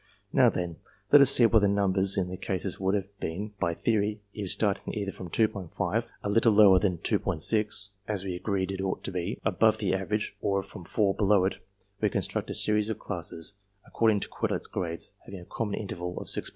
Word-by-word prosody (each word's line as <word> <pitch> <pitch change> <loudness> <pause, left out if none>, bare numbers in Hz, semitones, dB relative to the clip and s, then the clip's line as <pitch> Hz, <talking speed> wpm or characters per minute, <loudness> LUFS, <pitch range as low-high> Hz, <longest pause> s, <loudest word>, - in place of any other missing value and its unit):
Now, - - +6
then, 85 -3 -4 0.3
let 145 - +9
us 140 - +7
see 120 - +7
what 115 -1 +5
the 100 - +3
numbers 100 -1 +1
in 95 -2 +1
the 90 - -5
classes 95 0 -3
would 95 +1 +1
have 100 0 -4
been 100 +6 -4
by 85 - 0
theory 105 0 0
if, 100 -3 -4
starting 100 0 0
either 100 -2 -3
from 90 -2 -9
2'5 100 -4 -1 0.2
(a - - -2
little 115 +1 +4
lower 100 -3 +7
than 90 -3 0
2*6, 105 +5 +1 0.2
as 105 -3 -2
we 95 -2 -4
agreed 95 0 -2
it 95 0 -4
ought 95 -1 -3
to - - -3
be) 90 -2 -3
above - - +3
the - - -1
average, 105 +3 -2
or 100 -1 0
from 85 - -11
4, 100 +1 +1
below 100 -2 +3
it, 95 - -1 0.4
we 105 - +3
construct - - -2
a - - -3
series 105 0 +2
of 110 - -2
classes, 85 0 -5 0.3
according 110 -3 +1
to - - -3
Quetelet's - - -2
grades, 85 -3 -4
having 95 - -9
a - - -12
common 105 0 -3
interval 90 -3 -5
of - - -7
6*5. - - -1
100 Hz, 205 wpm, -28 LUFS, 95-105 Hz, 0.4 s, let